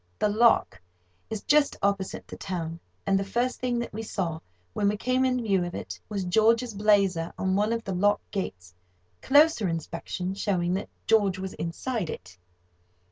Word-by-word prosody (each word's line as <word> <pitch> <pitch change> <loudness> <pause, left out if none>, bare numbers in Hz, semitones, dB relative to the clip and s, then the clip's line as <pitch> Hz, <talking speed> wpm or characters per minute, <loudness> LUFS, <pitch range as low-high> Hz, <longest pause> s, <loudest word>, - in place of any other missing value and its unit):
The 210 - +2
lock 215 - +3 0.5
is 220 -2 -4
just 295 -1 +3
opposite 200 -1 -1
the - - -8
town, 170 -3 -4 0.3
and 195 -1 +3
the - - -1
first 240 +6 -1
thing 250 -1 -1
that 235 -3 -4
we 220 - -4
saw, 175 -7 -3 0.3
when 200 - +1
we 210 +1 +1
came 255 +4 +1
in 255 -2 +1
view 195 -4 +2
of 175 0 -5
it, 90 -1 -6
was 200 -2 -2
George's 225 +5 +3
blazer 200 -5 +2
on 190 0 0
one 210 +2 +2
of 230 0 -1
the 195 - -3
lock 205 +3 +3
gates, 90 - -5 0.5
closer 290 -6 +5
inspection 170 +2 -4
showing 180 -3 0
that 195 - -3 0.2
George 205 -4 +3
was 190 0 -5
inside 180 +3 -3
it. 90 -1 -8
200 Hz, 175 wpm, -27 LUFS, 180-225 Hz, 0.5 s, closer